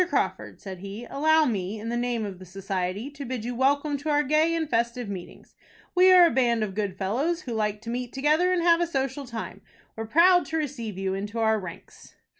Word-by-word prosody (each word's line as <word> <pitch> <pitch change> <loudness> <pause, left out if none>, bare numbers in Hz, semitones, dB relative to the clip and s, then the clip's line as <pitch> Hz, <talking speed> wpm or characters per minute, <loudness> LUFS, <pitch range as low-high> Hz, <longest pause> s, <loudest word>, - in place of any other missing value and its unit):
Crawford," - - -2
said 190 -3 -8
he, 200 +5 -7
"allow 315 +2 +3
me, 205 -4 -2
in 225 +2 -5
the 240 - -2
name 240 -2 -1
of 190 -3 -7
the 185 - -11
society, 190 +5 -4
to 285 0 -8
bid 250 -3 -5
you 245 - -3
welcome 285 +3 +1
to 305 +2 -4
our 295 0 +3
gay 310 +4 +2
and 320 -1 -1
festive 235 -1 -1
meetings. 190 -3 -9 0.4
We 370 +1 +6
are 360 -1 +8
a - - +3
band 235 -3 +2
of 200 -3 -4
good 200 -2 -2
fellows, 265 - -1
who 245 - -6
like 210 -1 -1
to 230 +1 -6
meet 245 0 -4
together 305 +6 +2
and 360 -2 +1
have 340 0 +4
a 345 - +1
social 270 -2 -3
time. 230 -2 -7 0.3
We 225 - -6
are 225 - -5
proud 355 +8 +5
to 320 - -2
receive 245 - -4
you 190 0 -2
into 205 +3 -5
our 220 -1 +2
ranks." 180 -4 -11
240 Hz, 230 wpm, -26 LUFS, 210-300 Hz, 0.4 s, are